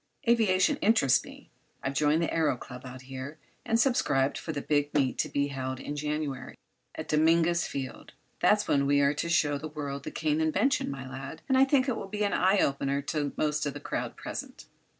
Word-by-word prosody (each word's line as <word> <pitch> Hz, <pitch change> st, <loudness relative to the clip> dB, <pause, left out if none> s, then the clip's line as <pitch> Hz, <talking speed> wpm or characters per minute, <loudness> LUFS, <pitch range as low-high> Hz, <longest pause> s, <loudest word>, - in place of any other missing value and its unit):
Aviation 210 Hz, -6 st, +3 dB
interests 195 Hz, -, +3 dB
me. -, -, -14 dB, 0.3 s
I've 135 Hz, -, -1 dB
joined 150 Hz, +3 st, +2 dB
the -, -, +1 dB
Aëro 150 Hz, -6 st, +1 dB
Club 125 Hz, +1 st, -9 dB
out 130 Hz, 0 st, -10 dB
here 135 Hz, +3 st, -7 dB, 0.3 s
and 230 Hz, -1 st, +1 dB
subscribed 145 Hz, -, +2 dB
for 160 Hz, -, -4 dB
the 145 Hz, -, -3 dB
big 145 Hz, -1 st, +1 dB
meet 135 Hz, -3 st, +1 dB
to -, -, 0 dB
be 140 Hz, 0 st, 0 dB
held 130 Hz, -1 st, -4 dB
in 145 Hz, -, -5 dB
January, 150 Hz, -2 st, -3 dB, 0.4 s
at -, -, -6 dB
Dominguez 165 Hz, +2 st, +3 dB
Field. 130 Hz, -3 st, -6 dB, 0.3 s
That's -, -, +3 dB
when 140 Hz, -1 st, +2 dB
we 140 Hz, 0 st, +4 dB
are 140 Hz, +1 st, +3 dB
to 170 Hz, +3 st, -3 dB
show 150 Hz, -4 st, +2 dB
the 155 Hz, -, -5 dB
world 145 Hz, -2 st, -5 dB
the -, -, -4 dB
Kane 155 Hz, 0 st, 0 dB
invention, 160 Hz, -, +1 dB
my 135 Hz, -2 st, -6 dB
lad, 135 Hz, +4 st, -8 dB
and 265 Hz, -, +2 dB
I 265 Hz, +1 st, +6 dB
think 270 Hz, -1 st, +2 dB
it 255 Hz, -, 0 dB
will 195 Hz, -, -6 dB
be 210 Hz, +2 st, -2 dB
an 200 Hz, -, +1 dB
eye 190 Hz, +2 st, +3 dB
opener 140 Hz, -3 st, 0 dB
to 145 Hz, -2 st, -1 dB
most 150 Hz, -1 st, 0 dB
of 140 Hz, -, -4 dB
the -, -, -5 dB
crowd -, -, -4 dB
present." -, -, -7 dB
150 Hz, 210 wpm, -29 LUFS, 140-170 Hz, 0.4 s, I